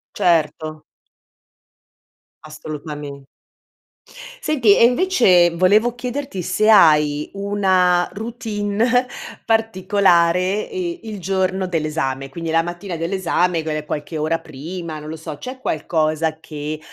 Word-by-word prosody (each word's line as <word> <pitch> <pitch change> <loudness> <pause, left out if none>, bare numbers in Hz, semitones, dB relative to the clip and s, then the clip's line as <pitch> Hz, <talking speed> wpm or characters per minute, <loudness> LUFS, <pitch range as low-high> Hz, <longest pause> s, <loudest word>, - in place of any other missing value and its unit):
Certo. 155 -2 0 1.6
Assolutame 150 -2 -8 1.2
Senti, 235 -10 +4
e - - +6
invece 240 - +4
volevo 205 +7 +3
chiederti 250 -3 -5
se 185 +5 0
hai 150 -7 +5
una 190 -3 +2
routine 225 +2 -1 0.4
particolare 190 -3 +2
e 355 -2 -4
il 215 -3 -7
giorno 190 0 -1
dell'esame. 150 -5 -2
Quindi 165 +4 -6
la 165 +1 +2
mattina 175 +2 -6
dell'esame 175 0 0
gue 155 -1 -4
qualche 150 +1 -5
ora 155 +2 0
prima, 160 +3 -7
non 150 0 -9
lo 160 - -5
so, 155 -2 -8
c'è 255 - -8
qualcosa 155 -4 -1
che, 150 -1 -6
175 Hz, 105 wpm, -20 LUFS, 155-205 Hz, 1.6 s, e